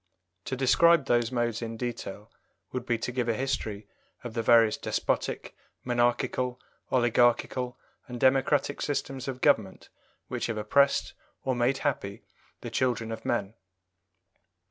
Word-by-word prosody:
To 130 - -2
describe 150 +4 +4
those 120 -3 +2
modes 120 -2 -1
in 115 -1 -5
detail 110 -3 -6 0.4
would 125 -1 -4
be 120 - +1
to 115 - -4
give 120 -1 -1
a 115 - +1
history 110 -5 -3 0.4
of 120 -2 -6
the 115 - -1
various 115 -1 +5
despotic, - - -2 0.3
monarchical, 120 +1 0 0.3
oligarchical, 120 0 +2 0.3
and 125 -1 -7
democratic 135 +2 +2
systems 135 -2 -3
of 130 -1 -5
government 110 -10 +1 0.4
which - - -3
have 115 -2 -3
oppressed 140 +7 +2 0.3
or 130 - 0
made 120 +2 +1
happy 100 -8 -2 0.4
the - - -6
children 120 -3 0
of 110 - -7
men. 105 -4 -1
120 Hz, 135 wpm, -28 LUFS, 115-130 Hz, 0.4 s, various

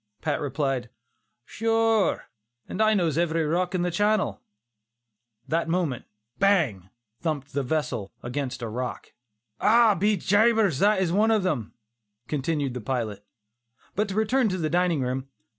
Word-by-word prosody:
Pat - - -1
replied, 135 -4 -2 0.6
"Sure 225 - +1 0.4
and 210 - -3
I 215 0 +4
knows 165 -5 +1
every 165 -1 +1
rock 180 +4 0
in 175 - 0
the 180 - 0
channel." 205 - +1 1.1
That 165 +1 0
moment 165 -8 -1 0.3
"bang" 150 - +2 0.3
thumped 145 -4 -3
the 140 - 0
vessel 130 -7 -2
against 125 0 -4
a - - -2
rock. 125 +3 -5 0.5
"Ah! 225 0 +5
be 205 +3 +1
jabers, 205 - +3
and 200 - +6
that 190 - +2
is 170 - -1
one 210 +5 +3
of 215 -4 +2
'em," 125 - -2 0.5
continued 145 -2 -1
the 125 - -5
pilot. 110 -4 -3 0.7
But 210 +1 0
to 195 - -4
return 220 +2 +2
to 185 - -2
the 155 -3 -2
dining 175 -4 +2
room. 130 +1 -2
165 Hz, 150 wpm, -26 LUFS, 135-205 Hz, 1.1 s, and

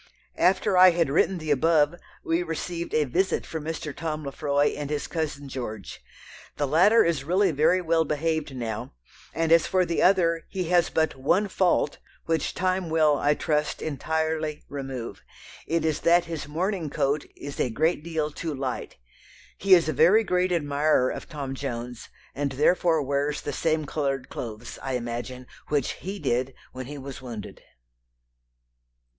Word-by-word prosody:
After 185 +1 +3
I 185 0 +10
had 170 -5 +1
written 180 +5 +2
the 155 -2 -3
above, 150 +1 +3 0.3
we 165 +2 +1
received 170 0 -4
a 155 - +4
visit 175 +8 0
from 160 -2 -6
Mr. 160 -2 -4
Tom 155 -2 -4
Lefroy 145 +1 +1
and 145 -1 -5
his 150 -1 -2
cousin 150 -4 -4
George. 115 -6 -7 0.5
The 145 - +1
latter 185 +11 +5
is 165 -5 0
really 185 +5 +2
very 155 +5 +3
well 165 -1 +2
behaved 155 -1 -2
now; 115 - -4 0.4
and 165 0 -1
as 165 -1 +5
for 185 -1 +2
the 170 - -1
other, 170 -3 +3
he 190 -2 -2
has 175 -1 +3
but 160 0 0
one 170 +10 +1
fault, 185 -6 +1 0.3
which 165 -2 -1
time 185 -1 0
will, 155 -2 +4
I 145 +1 +2
trust, 150 0 -1
entirely 155 +1 -2
remove 135 -4 -6 0.5
it 165 -1 0
is 155 -1 0
that 175 +1 +4
his 165 -4 -5
morning 170 +2 -2
coat 140 0 0
is 140 0 -8
a - - +1
great 155 +6 0
deal 160 -2 -2
too 155 0 -4
light. 130 - -4 0.6
He 195 -1 +6
is 170 -3 +2
a 155 - 0
very 180 - +5
great 180 -2 +1
admirer 145 -4 +2
of - - -7
Tom 140 -3 -5
Jones, 125 -3 -6 0.2
and 140 -1 -2
therefore 160 +2 +3
wears 140 +2 -1
the 145 - -4
same 155 +1 0
coloured 135 -3 -2
clothes, 115 0 -7
I 135 - -3
imagine, 125 +1 -4 0.2
which 145 -4 0
he 195 +2 -6
did 130 -5 -1 0.2
when 130 -1 -7
he 145 +1 -7
was 135 -1 -8
wounded." 115 -6 -8
155 Hz, 165 wpm, -26 LUFS, 140-170 Hz, 0.6 s, I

